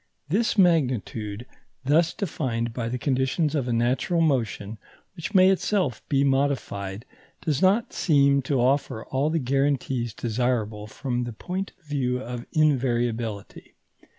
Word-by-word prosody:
This 220 +7 +1
magnitude, 125 - +1 0.4
thus 160 +4 +3
defined 120 - -2
by 115 -1 -3
the 125 - -2
conditions 135 +4 0
of 140 -5 -1
a - - -1
natural 125 +9 +1
motion 115 -8 0 0.4
which 190 +4 -6
may 185 0 +7
itself 185 - 0
be 140 -1 +3
modified, 130 -7 -1 0.4
does 150 -5 -1
not 200 +5 +3
seem 140 -4 +3
to 140 -3 +2
offer 125 -3 +1
all 135 +3 0
the 165 - 0
guarantees 135 -4 0
desirable 110 -3 -1
from 125 +1 -3
the 120 - -6
point 185 - -5
of 175 - -34
view 130 -4 -1
of 120 -1 -6
invariability. 120 - -1
130 Hz, 135 wpm, -25 LUFS, 120-155 Hz, 0.4 s, may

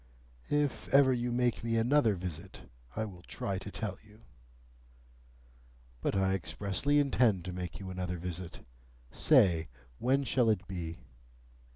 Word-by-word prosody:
If 145 -2 0
ever 135 -1 +5
you 120 0 -1
make 120 -1 +1
me 115 0 0
another 115 -2 +3
visit, 90 -3 -7 0.3
I 110 - -1
will 90 -4 -10
try 95 +2 -4
to 100 - -8
tell 100 -1 -4
you." 105 +1 -19 1.8
"But - - 0
I 95 0 +2
expressly 95 - 0
intend 125 - +3
to 90 - -4
make 90 -2 -5
you 95 -1 -6
another 90 -1 -3
visit. 90 0 -6 0.5
Say, 90 - +4 0.3
when 135 +3 +2
shall 125 -2 +2
it 100 -5 +1
be?" 85 -3 -5
100 Hz, 140 wpm, -32 LUFS, 90-125 Hz, 1.8 s, ever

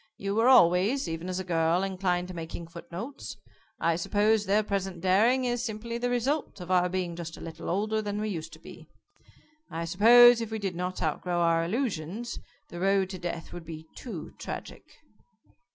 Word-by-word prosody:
You 195 0 -3
were 225 +3 +3
always, 195 +3 +5
even 165 +2 -4
as 185 0 -2
a - - -3
girl, 170 0 +1
inclined 185 -2 -1
to - - -6
making 165 0 -6
footnotes. 170 - -8 0.4
I 170 0 +2
suppose 210 +3 +2
their 210 +2 +3
present 195 -3 -3
daring 220 +8 +3
is 240 -1 -1
simply 230 +1 -4
the 245 +1 0
result 250 +4 -1
of 180 0 -6
our 180 -1 +3
being 180 -2 -2
just 165 -1 -7
a - - -11
little 165 -1 -7
older 215 +4 0
than 205 -1 -3
we 215 0 -2
used 165 -5 -5
to - - -12
be. - - -13 0.8
I 165 0 -4
suppose 235 +7 +7
if 225 - -4
we 220 - -3
did 195 -4 -3
not 180 +1 -3
outgrow 175 +3 -1
our 165 -1 +3
illusions, 210 - -3 0.3
the 175 - -8
road 195 0 +2
to 185 - -6
death 170 -1 -5
would 175 - -7
be 160 -1 -9
too 200 -11 -7
tragic." - - -7
185 Hz, 185 wpm, -28 LUFS, 170-220 Hz, 0.8 s, suppose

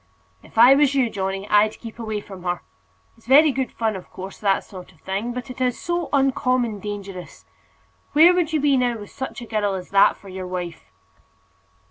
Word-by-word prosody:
"If - - -18
I 245 +4 +8
was 280 0 +3
you, 250 -4 +2
Johnny, 195 0 -3
I'd 210 +1 +3
keep 230 0 -10
away 220 -2 -3
from 195 -3 -11
her. 175 0 -2 0.5
It's 230 0 -25
very 295 +4 +6
good 265 -1 -2
fun, 220 -2 -1
of 185 - -9
course, 190 +1 -9
that 195 -2 +1
sort 185 -3 -12
of 165 - -26
thing; 200 +5 -3
but 250 +1 -6
it 255 - -9
is 250 -1 0
so 345 -1 -2
uncommon 255 -5 +1
dangerous! 195 -3 -8 0.7
Where 330 +4 +7
would 350 -3 0
you 310 - +1
be 280 -1 +3
now 245 -2 +1
with 205 -2 -11
such 265 -2 -6
a - - -8
girl 210 -3 -1
as 180 -1 -7
that 200 0 +5
for 200 - -16
your 185 -1 -6
wife?" 180 -2 -6
220 Hz, 200 wpm, -22 LUFS, 195-260 Hz, 0.7 s, I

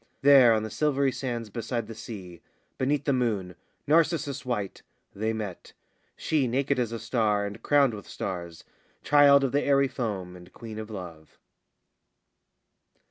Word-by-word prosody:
There 135 -4 +8
on 110 -1 0
the 110 - -5
silvery 140 -3 +1
sands 120 -5 -4
beside 115 +1 -3
the 115 - -8
sea, 100 -6 -9 0.4
Beneath 140 +2 +1
the 140 - +2
moon, 105 -8 -1 0.3
narcissus 155 -3 +1
white, 105 -7 -3 0.3
they 110 +3 -1
met, 105 -5 -6 0.4
She 150 -5 0
naked 135 +2 0
as 120 -2 -1
a 115 - -3
star 110 -3 0
and 100 0 -7
crowned 140 -4 +3
with 105 - -9
stars, 85 -3 -6 0.4
Child 145 -1 +6
of 135 - 0
the 145 - +2
airy 140 -1 +3
foam 105 -9 -4
and 90 0 -14
Queen 110 -2 -9
of 110 0 -7
Love. 85 -7 -9
115 Hz, 150 wpm, -27 LUFS, 105-140 Hz, 0.4 s, There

